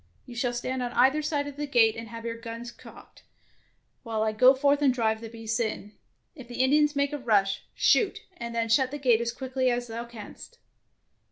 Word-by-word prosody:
You 245 - -11
shall 245 0 0
stand 255 +2 -3
on 245 -1 -3
either 270 +5 +4
side 295 -1 -1
of 285 -1 -8
the 295 0 -3
gate 230 -5 +4
and 225 0 -7
have 230 0 -9
your 230 0 -3
guns 230 +1 -7
cocked, - - -15 0.8
while 225 -3 -2
I 220 - +1
go 250 +5 +6
forth 285 +2 +2
and 280 -2 +4
drive 220 -3 0
the 225 - -7
beasts 225 0 -3
in. 215 -2 -3 0.4
If 260 -7 -12
the 245 +1 -1
Indians 295 +2 +3
make 280 +1 0
a 295 - -3
rush, 205 -6 +1
shoot, 430 0 +3 0.2
and 235 0 -6
then 230 0 0
shut 255 +3 +3
the 290 - -5
gate 245 -5 +3
as 235 0 -1
quickly 260 0 -1
as 245 0 -1
thou 230 0 -6
canst. 235 - -11
240 Hz, 210 wpm, -27 LUFS, 230-275 Hz, 0.8 s, go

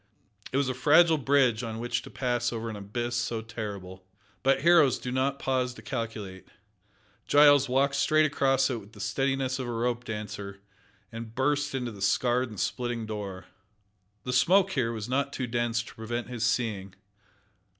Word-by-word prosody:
It 130 - 0
was 140 -1 +1
a 130 - 0
fragile 155 +5 +5
bridge 130 -4 +3
on 115 -2 -5
which 120 +1 -2
to - - -11
pass 120 -2 -1
over 115 -1 -4
an - - -6
abyss 120 +4 -4
so 115 -2 -2
terrible. 100 -5 -7 0.4
But 135 +1 +2
heroes 160 -7 +5
do 125 - -5
not 135 +2 0
pause 130 -2 -1
to - - -13
calculate. 110 -7 -5 0.8
Giles 145 -2 +6
walked 135 +2 +2
straight 155 +2 +3
across 135 -2 +2
it 120 - -2
with 105 +2 -17
the 105 - -14
steadiness 135 +5 -1
of 130 - -3
a - - -3
rope 120 +1 -1
dancer, 100 -2 -6 0.5
and 115 0 -8
burst 145 +1 0
in 130 -2 -2
the 105 -5 -7
scarred 125 +5 +1
and 105 -4 -9
splitting 120 -2 -2
door. 100 -4 -6 0.8
The 125 - -3
smoke 190 +9 +4
here 125 -8 0
was 110 -2 -5
not 140 +2 0
too 130 - -3
dense 120 -1 -1
to - - -12
prevent 120 +2 -5
his 120 -2 -4
seeing. 105 -6 -1
120 Hz, 175 wpm, -28 LUFS, 110-135 Hz, 0.8 s, Giles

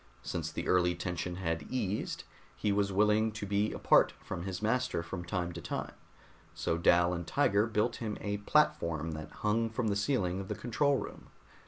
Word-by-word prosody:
Since - - -3
the - - -4
early 90 -1 +3
tension 90 0 -3
had 85 -3 -2
eased, 105 -5 -2 0.3
he 105 - 0
was 100 0 +1
willing 105 +2 +3
to 110 -1 -5
be 100 +2 +1
apart - - +4
from 85 - -6
his 95 -2 -3
master 115 -4 0
from 85 +1 -5
time 90 0 -2
to - - -7
time, - - -4 0.6
so - - 0
Dal 85 +1 +4
and 85 -1 -4
Tiger 105 -6 +3
built 110 +2 0
him 110 -3 -3
a 105 0 -2
platform 85 - +1
that 80 0 -6
hung 115 +2 0
from 110 0 -1
the 100 - +1
ceiling 100 -5 0
of 95 - -5
the - - -3
control 140 +4 +1
room. - - -7
100 Hz, 185 wpm, -32 LUFS, 90-110 Hz, 0.6 s, apart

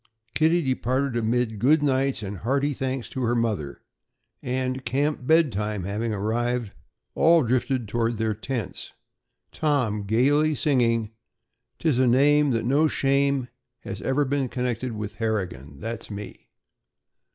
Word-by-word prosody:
Kitty 165 +2 +3
departed 130 0 0
amid 115 -1 0
"Good 145 +7 +4
nights" 135 -4 +1
and 100 0 -5
hearty 140 +6 0
thanks 130 -1 -3
to 130 - -5
her 120 0 +1
mother, 105 -12 -2 0.6
and, 130 +1 -2
camp 135 +2 -1
bed 160 -3 +4
time 105 -1 -3
having 105 +4 -2
arrived, 115 +2 -1 0.4
all 165 -1 +5
drifted 125 0 0
toward 115 +2 -1
their 110 0 0
tents, 115 -1 -5 0.6
Tom 130 -9 0
gaily 145 +8 +3
singing: 115 -6 +1 0.7
"'Tis 150 -7 +1
a 130 - +4
name 145 +4 +4
That 115 -3 0
no 145 +5 +3
shame 140 -2 +1 0.3
Has - - -7
iver 140 +2 +1
been 135 -1 -1
connected 125 -1 -2
with 105 -1 -6
Harrigan! 90 - -3
That's 115 +4 -5
me." 105 -1 -9
125 Hz, 135 wpm, -25 LUFS, 110-140 Hz, 0.7 s, all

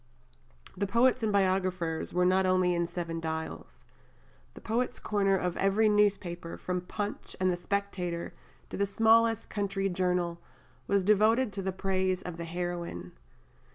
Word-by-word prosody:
The 200 +2 -1
poets 240 +4 +3
and 220 -1 +1
biographers 185 -4 0
were 180 +1 +2
not 185 +1 +3
only 185 -1 +3
in 170 0 0
Seven 170 -1 -4
Dials. 160 0 -5 0.7
The - - -9
Poet's 245 +3 -1
Corner 195 -2 +1
of 180 -1 -2
every 200 +3 +3
newspaper, 195 -5 0
from 180 0 -3
Punch 205 +3 -5
and 185 0 +2
the - - 0
Spectator 180 -2 -3 0.4
to - - -4
the 200 - +1
smallest 225 +2 +3
country 195 -1 -1
journal, 180 -2 -1 0.5
was 200 -1 +2
devoted 215 +3 +3
to 195 - -3
the 190 0 -2
praise 190 -1 -1
of 180 -2 -6
the 170 - -5
heroine. 170 - -4
185 Hz, 150 wpm, -29 LUFS, 175-205 Hz, 0.7 s, poets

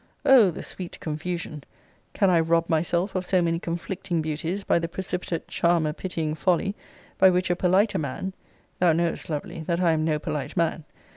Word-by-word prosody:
O 250 -7 +7
the 165 - -6
sweet 180 -2 -7
confusion! 155 -1 -4 0.5
Can 195 -2 +3
I 170 - +5
rob 165 +1 +2
myself 175 +4 0
of 185 - -1
so 185 0 +2
many 165 -1 +1
conflicting 170 0 -3
beauties 160 +5 -3
by - - +2
the 165 - -2
precipitate 180 -1 -4
charmer 170 -3 +1
pitying 165 -3 -3
folly, 180 +4 +1 0.5
by 190 - +8
which 180 0 +1
a - - +2
politer 190 +4 +2
man 155 +6 -4 0.5
[thou 175 -2 +4
knowest, 170 +2 -1
lovely, 160 +3 -4
that 170 -1 0
I 175 -2 +3
am 155 -1 +1
no 155 -1 +1
polite 150 -2 -4
man! 165 -2 0
170 Hz, 175 wpm, -25 LUFS, 160-185 Hz, 0.5 s, by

